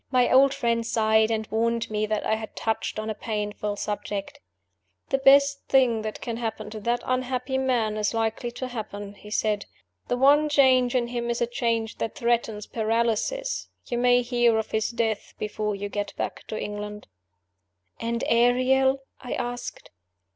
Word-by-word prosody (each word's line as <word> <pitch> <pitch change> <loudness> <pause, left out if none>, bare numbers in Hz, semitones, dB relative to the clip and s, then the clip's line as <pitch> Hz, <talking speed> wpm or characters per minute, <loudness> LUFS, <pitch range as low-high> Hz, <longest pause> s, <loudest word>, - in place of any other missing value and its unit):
My 250 -1 +3
old 270 +1 +7
friend 235 -4 0
sighed, 220 -1 +3
and 220 -1 -1
warned 230 +1 0
me 215 0 0
that 215 0 -1
I - - +2
had 220 0 -4
touched 220 -1 -2
on 215 0 -2
a - - -2
painful 210 -1 -3
subject. 205 +6 -4 0.7
"The 270 - +1
best 280 +1 +5
thing 250 -4 +3
that 215 0 -5
can 230 -2 -4
happen 220 -2 -4
to 215 - -6
that 235 +3 -1
unhappy 255 +1 -1
man 235 -5 +1
is 210 -1 0
likely 225 +1 -1
to 255 +1 -5
happen," 205 -4 -6
he 210 +1 -13
said. 210 -1 0 0.4
"The 245 - 0
one 290 +4 +5
change 260 -3 +4
in 240 -1 +1
him 240 -1 -3
is 235 +1 -1
a 240 - +2
change 230 -2 -1
that 225 - -3
threatens 235 -5 0
paralysis. 235 - -1 0.2
You 240 - -2
may 245 0 +4
hear 240 -2 +3
of 220 - -3
his 220 0 0
death 225 -3 -2
before 210 0 -2
you 200 +1 -4
get 205 0 -4
back - - -4
to 215 - -4
England." 210 0 -6 0.9
"And 235 0 -2
Ariel?" 260 +3 +3 0.2
I 250 - -5
asked. 245 0 -5
230 Hz, 170 wpm, -26 LUFS, 215-250 Hz, 0.9 s, old